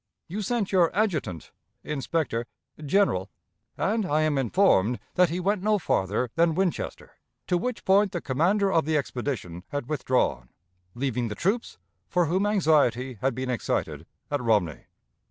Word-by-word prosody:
You 200 +6 -4
sent 210 -1 -1
your 180 -4 +4
adjutant 155 - -1 0.3
(inspector?) 140 -4 -2 0.4
general, 145 - +2 0.5
and 215 +2 +1
I 155 -4 +1
am 155 -1 +1
informed 125 - +3 0.2
that 180 -2 +4
he 170 +3 -2
went 195 +2 0
no 210 +1 +2
farther 110 - 0
than 165 -1 +2
Winchester, 185 -1 -3 0.3
to 180 - +1
which 240 +7 -2
point 195 +1 +4
the 175 - -2
commander 185 +9 +1
of 165 -5 +2
the 155 0 +1
expedition 120 - -4
had 145 -4 -4
withdrawn; 125 - 0 0.5
leaving 125 -2 -1
the 105 - -5
troops, 205 - -1 0.3
for 180 -1 +2
whom 185 +6 +1
anxiety 145 - +2
had 135 -2 0
been 130 0 -2
excited, 120 - -2 0.2
at 145 -2 0
Romney. 105 -9 0
155 Hz, 150 wpm, -26 LUFS, 125-190 Hz, 0.5 s, your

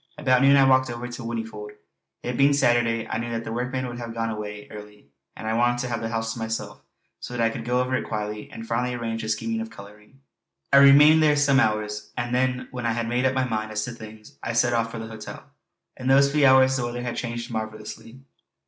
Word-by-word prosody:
About 130 -4 +3
noon 140 +1 +6
I 135 - +6
walked 130 -1 +4
over 120 +1 -5
to 120 +1 -8
Whinnyfold; 110 -3 -6 0.5
it 125 - -3
being 140 +3 +4
Saturday 120 -4 +2
I 110 - -3
knew 120 0 -4
that 115 0 -3
the 115 - -5
workmen 125 +2 -2
would 120 -1 -6
have 115 -1 -7
gone 115 0 -2
away 105 -1 -7
early, 105 -6 -12 0.3
and - - -8
I 110 - -1
wanted 120 +1 +2
to 125 - -4
have 120 -1 -3
the 115 - -3
house 115 0 -2
to 120 - -8
myself 110 0 -4 0.4
so 125 - -7
that 115 - +1
I 115 - +1
could 115 - -6
go 125 +1 +1
over 125 +1 -2
it - - -3
quietly 105 -1 -4
and 115 - -9
finally 125 +2 -1
arrange 115 -1 -3
the 110 - -5
scheme 225 - -1
of 225 - -6
colouring. 105 - -15 0.5
I - - +8
remained 145 +3 +8
there 150 -1 +4
some 140 -2 +3
hours, 105 -3 -1
and 120 0 -2
then, 125 0 0
when 125 -2 -3
I 115 - +1
had 115 0 -2
made 120 +2 0
up 130 - -1
my 130 -1 +1
mind 110 -3 -3
as 105 0 -1
to - - -6
things, 110 -2 -12
I 115 - -3
set 120 +1 +2
off 115 -1 0
for 115 - -7
the 115 - -6
hotel. 110 -1 -10 0.4
In 130 - -6
those 140 +1 +5
few 145 -1 +4
hours 130 0 +5
the 125 - -2
weather 120 0 -5
had 120 -1 -3
changed 120 0 -5
marvellously. 110 +2 -7
120 Hz, 245 wpm, -24 LUFS, 110-130 Hz, 0.5 s, I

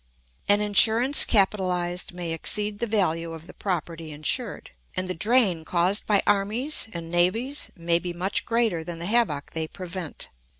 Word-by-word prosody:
An 205 +1 +5
insurance 225 +6 +4
capitalised 185 -4 +1
may 175 -2 -5
exceed 205 +5 +2
the 235 - -1
value 165 -6 0
of 160 0 -10
the - - -13
property 165 -4 -4
insured, 150 0 -2 0.2
and 185 - -2
the 185 - -2
drain 200 -3 +2
caused 180 +5 0
by 205 -2 +3
armies 215 +9 0
and 165 -1 -7
navies 225 +11 +1
may 170 -1 +1
be 175 0 -5
much 180 +3 -1
greater 225 -8 0
than 170 +1 -6
the 170 - -4
havoc 205 -9 0
they 160 -1 -3
prevent. 180 -2 -6
185 Hz, 160 wpm, -25 LUFS, 170-210 Hz, 0.2 s, An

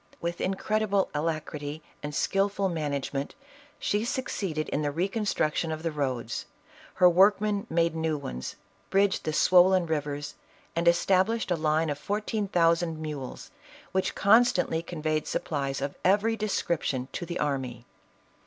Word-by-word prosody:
With 170 +1 -3
incredible 200 +1 0
alacrity 150 -1 -3 0.2
and 150 0 -5
skillful 195 0 +1
management, 145 -4 -3 0.4
she 205 +1 0
succeeded 195 - -2
in 145 - -1
the 145 - 0
recon 195 +8 -1
struction 160 -2 0
of 155 0 -4
the 165 - -1
roads; 130 -6 -3 0.5
her 180 - +6
workmen 200 +3 +3
made 165 0 +2
new 160 -1 0
ones, 65 - -6 0.3
bridged 195 0 +2
the 155 - 0
swollen 180 +2 +5
rivers, 145 -2 -3 0.4
and 170 +1 0
established 190 +5 +3
a - - +4
line 155 0 +1
of 145 - -4
fourteen 210 +3 -2
thousand 165 -2 +2
mules, 150 -4 -6 0.4
which 190 0 0
constantly 210 -6 +4
conveyed 155 -2 -2
supplies 135 -3 -2
of 140 +1 -2
every 205 +4 +3
description 170 - -1
to - - -4
the 175 0 -4
army. 130 -5 -2
165 Hz, 135 wpm, -28 LUFS, 150-195 Hz, 0.5 s, her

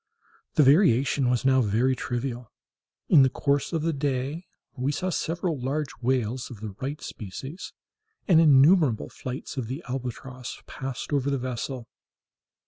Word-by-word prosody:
The 150 - +6
variation 140 - +4
was 125 0 0
now 130 -1 +5
very 120 +4 +2
trivial. 120 -2 -4 0.6
In 155 - +7
the 130 - +5
course 140 +2 0
of 165 -3 -1
the 165 0 +1
day 140 +3 -2 0.3
we 135 +1 -1
saw 185 +5 -2
several 170 -2 -2
large 140 +2 -2
whales 125 -1 0
of 115 - -10
the 110 -1 -6
right 140 +3 -3
species, 130 - -7 0.6
and 165 -4 +6
innumerable 150 - +5
flights 130 +2 -7
of 125 -4 -2
the 135 +7 -5
albatross 125 0 -6
passed 135 +2 -6
over 140 -1 +1
the 140 - +1
vessel. 125 0 -4
135 Hz, 145 wpm, -26 LUFS, 125-145 Hz, 0.6 s, In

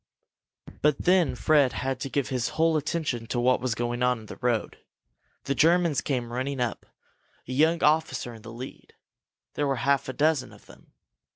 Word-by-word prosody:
But 150 -1 +2
then 180 -6 +3
Fred 140 -1 +3
had 135 -1 -2
to 135 - -4
give 140 0 -1
his 125 -3 -1
whole 165 0 +3
attention 150 -6 -2
to 120 - -2
what 125 +1 +2
was 125 -3 -1
going 120 +1 -2
on 125 -2 +2
in - - -12
the - - -10
road. 120 -3 -1 0.6
The 140 - -1
Germans 165 -1 +3
came 120 -4 -3
running 130 +2 -2
up, 120 -3 -3 0.6
a - - -6
young 160 +5 +2
officer 155 -5 +1
in 110 - -12
the 115 +1 -10
lead. 125 +3 -10 0.6
There 145 - -1
were 135 - +1
a 130 - -4
half 140 -1 +2
dozen 150 -3 +1
of - - -17
them. - - -18
135 Hz, 185 wpm, -26 LUFS, 120-150 Hz, 0.6 s, then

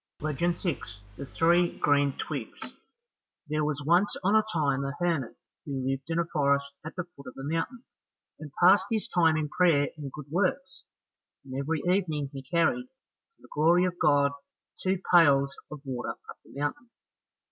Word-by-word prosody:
Legend 155 +3 -1
6 135 - -4
The 140 +4 -7
Three 170 +5 +2
Green 145 -1 +2
Twigs - - -5 0.9
There 155 +1 0
was 145 -1 -2
once 175 +6 +3
on 200 +3 +3
a 220 - +6
time 140 -4 0
a 140 0 -3
hermit 165 -8 -1 0.3
who 135 -3 -4
lived 135 +2 -3
in 165 - -1
a 170 - +2
forest 140 -4 0
at 160 - -8
the 180 - -2
foot 140 -6 -16
of 125 - -9
a 135 - -7
mountain, 165 - -3 0.6
and 155 - -8
passed 190 +2 +6
his 220 0 -1
time 165 -7 +3
in 155 -1 -1
prayer 150 -3 +3
and 145 -3 -7
good 150 0 -9
works, 235 - -1 0.6
and 130 - -9
every 140 +3 -2
evening 165 -7 0
he 135 - -6
carried, 170 - +1
to 265 +12 -43
the - - -17
glory 170 +4 +4
of 180 -1 -3
God, 140 -1 +4 0.5
two 190 0 0
pails 140 -5 +5
of 150 -2 -8
water 125 -2 -4
up - - -10
the 140 - -11
mountain. 145 +12 -3
155 Hz, 175 wpm, -28 LUFS, 140-175 Hz, 0.9 s, a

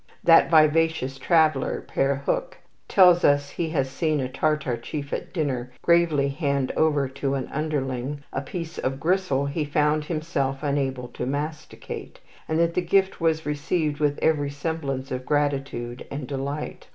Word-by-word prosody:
That 165 -1 +6
vivacious 155 -4 +3
traveller, 155 -3 +2
Pere 140 0 0
Huc, - - -1 0.3
tells 180 -3 +6
us 145 0 +3
he 165 -2 -2
has 140 -5 0
seen 155 +2 -1
a 130 - -1
Tartar 135 -1 0
chief 140 +4 -6
at - - -4
dinner 130 -7 -2
gravely 165 -5 +3
hand 140 -2 -1
over 150 -3 +2
to 135 +1 -2
an 130 -2 -3
underling 140 -2 -2
a 130 - -1
piece 165 +3 -6
of 135 +1 -2
gristle 165 -4 +1
he 145 +3 -2
found 150 +1 +1
himself 150 -4 -2
unable 135 -3 -1
to 125 +1 -5
masticate, 150 +3 -5 0.3
and 160 - 0
that 170 0 +2
the 180 - +1
gift 190 +1 +1
was 160 -1 +1
received 150 +1 -1
with 145 -1 +1
every 145 -3 +2
semblance 140 -3 -4
of 130 0 -3
gratitude 135 -4 -2
and 140 -1 -5
delight. 140 +2 -5
145 Hz, 155 wpm, -25 LUFS, 135-160 Hz, 0.3 s, That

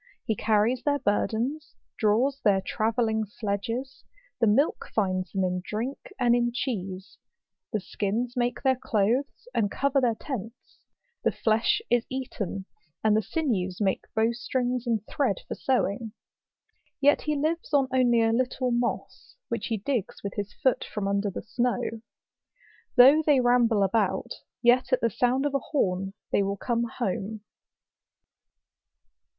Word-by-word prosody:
He 220 - 0
carries 220 +4 +2
their 290 -1 +1
burdens, 245 +7 -1 0.2
draws 245 +6 +2
their 200 -3 +4
travelling 220 +2 0
sledges; 230 +6 -4 0.4
the 230 - +3
milk 270 +9 +2
finds 185 -3 0
them 190 -1 0
in 180 0 -1
drink, 230 +8 -5
and 240 -1 +4
in 240 0 +1
cheese; 195 -7 -4 0.5
the 215 - 0
skins 220 +6 -2
make 245 -1 -1
their 265 -1 +4
clothes, 240 +4 -1
and 225 -4 +1
cover 275 +4 +1
their 235 -3 +2
tents; 230 -2 -7 0.4
the - - +3
flesh 230 - +1
is 240 -1 +2
eaten; 210 -7 -4 0.4
and 215 -1 +4
the 220 - +3
sinews 205 - -1
make 195 -3 0
bowstrings 245 +2 0
and 220 -3 0
thread 260 -9 0
for - - -3
sewing. 225 -4 -1 0.9
Yet 290 +1 +4
he 300 0 -1
lives 310 +3 -1
on 280 -3 +3
only 240 -3 +4
a 225 0 +2
little 255 +1 0
moss, 240 0 -3
which 230 -3 -2
he 225 - -1
digs 225 -1 -3
with 200 - -4
his 205 0 -4
foot 260 - +1
from 205 -2 -4
under 200 +1 0
the 195 - -6
snow. 245 +2 0 1.2
Though 270 +5 +8
they 295 -3 +4
ramble 245 -4 +3
about, 195 +2 0 0.3
yet 245 +2 +4
at 255 - +3
the 230 - +2
sound 245 +5 +1
of 290 - 0
a 275 - +2
horn 195 - -1 0.2
they - - +3
will 200 0 -1
come 235 +2 0
home. 215 -1 -2
235 Hz, 145 wpm, -27 LUFS, 205-255 Hz, 1.2 s, Though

